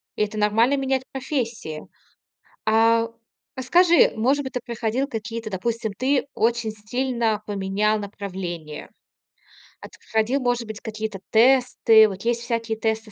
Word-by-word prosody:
это 210 0 -2
нормально- 225 +6 +3
менять 265 -1 0
профессии. 235 - -4 0.8
А, 230 +1 +4 0.5
расскажи, 340 +7 +4
может 270 +6 +1
быть, 265 - -7
ты 250 - -1
проходил 240 +3 -2
какие-то 225 -2 -5
допустим, 220 +2 -3
ты 265 +5 0
очень 230 -1 0
стильно 225 0 -2
поменял 205 +1 0
направление, 180 -6 -6 0.9
а - - -8
ты - - -18
проходил, 225 +5 0
может 245 -2 -1
быть, 215 -1 -7
какие-то 215 -2 -5
тесты? 230 -2 +5
Вот 195 0 -7
есть 235 0 0
всякие 230 -1 -2
тесты 220 0 -2
225 Hz, 130 wpm, -23 LUFS, 215-245 Hz, 0.9 s, тесты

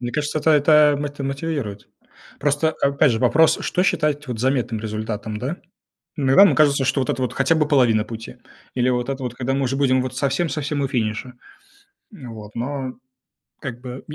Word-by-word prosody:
Мне 120 -1 -4
кажется, 150 +1 -1
это 160 - +2
это 150 0 +5
мот 145 0 -5
мотивирует. 140 -7 -4 0.5
Просто, 145 +2 +1
опять 140 0 +3
же, 110 - -1
вопрос, 150 +6 +4
что 180 - 0
считать 150 -5 0
вот 120 -3 -4
заметным 125 -4 0
результатом, 110 0 -4
да? 140 +9 -3 0.6
Иногда 140 +5 +6
нам 200 - +4
кажется, 140 -3 +3
что 135 - +1
вот 130 - -1
это 130 - -2
вот 125 - -1
хотя 135 +4 +2
бы 150 -2 +1
половина 120 -7 +3
пути. 115 +2 -9 0.4
Или 125 0 +1
вот 125 0 -1
это 135 0 -4
вот, 125 -1 -4
когда 130 +1 -2
мы 135 - 0
уже 135 +1 -1
будем 130 -2 +2
вот 130 0 -5
совсем-совсем 145 +1 -1
у 135 - -1
финиша. 120 +1 -2 0.8
Ну 130 - -10
вот, 105 -1 -11
но, 130 +1 -4 0.7
как 125 -5 -6
бы, 125 0 -8
135 Hz, 185 wpm, -21 LUFS, 120-145 Hz, 0.8 s, Иногда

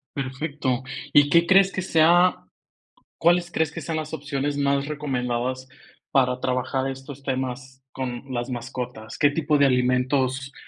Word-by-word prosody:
Perfecto, 135 -1 -2 0.3
¿y 145 0 +5
qué 170 0 +5
crees 195 +1 +5
que 190 - -3
sea 175 +1 +4 0.7
cuáles 175 0 +3
crees 160 -3 0
que - - -6
sean 165 -1 -3
las 155 0 -5
opciones 145 -1 -3
más 140 0 +1
recomendadas 130 -3 -3 0.4
para 125 -2 +2
trabajar 130 +1 -1
estos 135 +1 -9
temas 130 0 -4
con 125 -2 -4
las 120 0 -3
mascotas? 120 -2 -6
¿Qué 145 - +5
tipo 150 0 +1
de 140 - +5
alimentos 130 +1 +1
135 Hz, 140 wpm, -24 LUFS, 125-150 Hz, 0.7 s, y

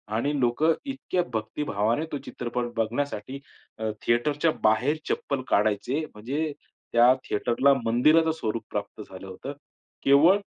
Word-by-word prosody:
आणि 140 +6 0
लोकं 130 +6 +3
इतक्या 270 -9 -2
भक्तिभावाने 110 +3 -1
तो 145 - -2
चित्रपट 120 0 -3
बघण्यासाठी 120 +2 -2 0.4
अ, 110 0 -1
थिएटरच्या 145 +7 +2
बाहेर 125 +8 +3
चप्पल 140 -2 -1
काढायचे. 105 +8 +1
म्हणजे 140 +9 -3 0.4
त्या 120 +2 +7
थिएटरला 120 +6 +2
मंदिराचं 155 +8 +4
स्वरूप 115 -8 -3
प्राप्त 105 +1 -4
झालं 95 -2 -10
होतं. 95 +9 -7 0.5
केवळ 155 +8 +6
125 Hz, 120 wpm, -26 LUFS, 110-150 Hz, 0.5 s, त्या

